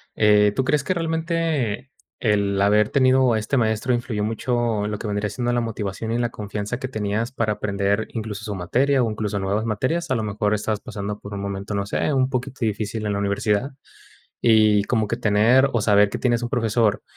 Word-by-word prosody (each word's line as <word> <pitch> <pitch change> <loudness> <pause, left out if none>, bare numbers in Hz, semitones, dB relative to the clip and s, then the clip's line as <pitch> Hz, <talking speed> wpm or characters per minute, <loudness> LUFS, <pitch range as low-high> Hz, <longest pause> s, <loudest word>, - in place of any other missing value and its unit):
Eh, 105 -1 +4
¿tú 130 - +1
crees 145 +2 +1
que 185 - -1
realmente 160 - -1 0.3
el 100 -3 +1
haber 105 +1 +3
tenido 130 -2 +4
a 110 - +1
este 110 +6 -2
maestro 110 +2 +1
influyó 115 -3 -2
mucho 115 -1 -1
en - - -2
lo 105 - -3
que, - - -8
vendría 105 0 -1
siendo, 120 -1 -2
la 120 - +1
motivación 110 -1 -4
y 115 - 0
la 120 -1 0
confianza 105 +3 -5
que 130 - -3
tenías 110 +1 -2
para 110 -4 0
aprender, 100 +1 -1
incluso 110 -2 -5
su 105 -3 -4
materia, 125 +9 +1
o 115 - 0
incluso 105 -1 -3
nuevas 100 +2 -1
materias? 130 +10 -1
A 130 - +1
lo 110 - -1
mejor 105 0 0
estabas 105 0 -2
pasando 105 0 -6
por 100 0 -8
un - - -4
momento, 100 +1 -4
no 100 0 -1
sé, 130 - -1
un 130 -1 +2
poquito 130 0 -4
difícil 110 0 -3
en 105 - 0
la 100 - -1
universidad. 105 +5 0 0.7
Y 110 -3 +4
como 110 -3 0
que 115 - -1
tener 120 +5 +4
o 115 - +1
saber 105 -1 +4
que - - -4
tienes 120 -2 +1
un - - -1
profesor 115 -3 +1
110 Hz, 210 wpm, -22 LUFS, 105-125 Hz, 0.7 s, Eh